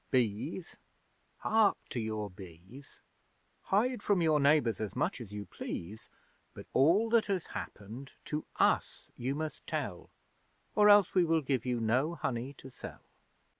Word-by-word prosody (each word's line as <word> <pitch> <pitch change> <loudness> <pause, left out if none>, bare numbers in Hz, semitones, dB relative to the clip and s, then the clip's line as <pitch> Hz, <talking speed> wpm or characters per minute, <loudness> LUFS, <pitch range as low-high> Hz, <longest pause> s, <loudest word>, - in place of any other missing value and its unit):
Bees! 125 - -1 0.6
Hark 220 -2 +4
to 125 - -3
your 110 -2 -3
bees! 95 - -13 0.6
'Hide 230 +4 +1
from 205 -3 +2
your 160 -3 +3
neighbours 140 -7 +3
as 105 -2 -4
much - - -1
as 105 -4 -9
you 105 0 -5
please, 100 +4 -7 0.5
But - - -9
all 170 - +4
that 230 -2 +4
has 190 -4 -1
happened, 115 +7 -7
to 150 0 -3
us - - +1
you 130 +3 -2
must 155 0 -5
tell, - - -4 0.6
Or 210 -1 +6
else 205 -2 +6
we 185 - +5
will 165 -2 +2
give 130 -3 -1
you 125 -1 0
no 130 +9 +1
honey 125 -3 -3
to 135 -1 -12
sell!' - - -10
135 Hz, 150 wpm, -32 LUFS, 110-170 Hz, 0.6 s, Or